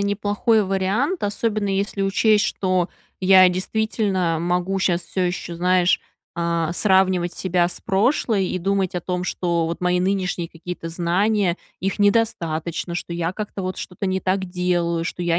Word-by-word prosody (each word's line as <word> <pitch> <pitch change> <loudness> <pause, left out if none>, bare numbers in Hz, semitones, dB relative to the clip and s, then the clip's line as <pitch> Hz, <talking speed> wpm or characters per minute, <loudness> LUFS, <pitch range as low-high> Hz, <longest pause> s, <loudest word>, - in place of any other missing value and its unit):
неплохой 205 +2 +1
вариант, 195 - 0
особенно 205 0 -1
если 195 +1 -1
учесть, 210 +2 +3
что 185 -2 0 0.3
я 185 0 +7
действительно 190 -3 0
могу 180 +3 0
щас 180 -2 +1
всё 185 - -3
еще, 175 -1 -3
знаешь, 180 0 +3 0.4
э, 170 -1 0
сравнивать 185 -2 +2
себя 180 -2 +1
с 175 - -7
прошлой 205 -1 +1
и 185 - -2
думать 195 -1 0
о 180 - -1
том, 180 +1 -3
что 170 -3 0
вот 170 +2 -4
мои 180 0 +2
нынешние 185 -2 -1
какие-то 165 0 -7
знания, 180 +2 +1 0.2
их 195 +2 -2
недостаточно, 170 -6 0
что 175 - -4
я 170 +1 -2
как-то 205 -1 -5
вот 185 0 -3
что-то 195 +2 -5
не 190 0 0
так 190 +1 0
делаю, 175 -2 0
что 175 - -4
я 170 0 +2
185 Hz, 155 wpm, -22 LUFS, 175-200 Hz, 0.4 s, я